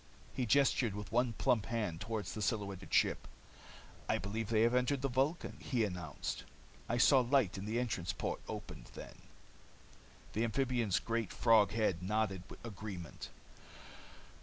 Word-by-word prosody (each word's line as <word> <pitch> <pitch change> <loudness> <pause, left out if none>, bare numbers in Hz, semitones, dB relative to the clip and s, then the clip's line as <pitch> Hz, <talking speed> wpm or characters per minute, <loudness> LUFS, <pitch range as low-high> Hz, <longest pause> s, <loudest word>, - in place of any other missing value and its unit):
He 125 -2 -1
gestured 125 -3 +3
with 105 0 -6
one 120 0 +2
plump 110 0 +1
hand 105 -8 -2
toward 110 -2 -3
the 105 +4 -5
silhouetted 100 -4 -2
ship. - - +2 0.8
"I - - +3
believe 105 +3 -3
they 110 -1 +4
have 120 +1 +3
entered 125 +2 +1
the - - +3
Vulcan," 135 +7 0
he 120 -4 0
announced. 90 -8 -4 0.5
"I 120 - +1
saw 135 +2 +6
light 125 -5 +2
as 95 - -5
the 110 +3 0
entrance 95 -8 -1
port - - -3
opened - - -7
then." - - -10 1.1
The 110 - +1
amphibian's 120 -3 +1
great, 115 -3 -1
frog 110 -3 +4
head 105 -6 +1
nodded 100 -1 0 0.2
agreement. 100 - -7
110 Hz, 145 wpm, -35 LUFS, 100-120 Hz, 1.1 s, saw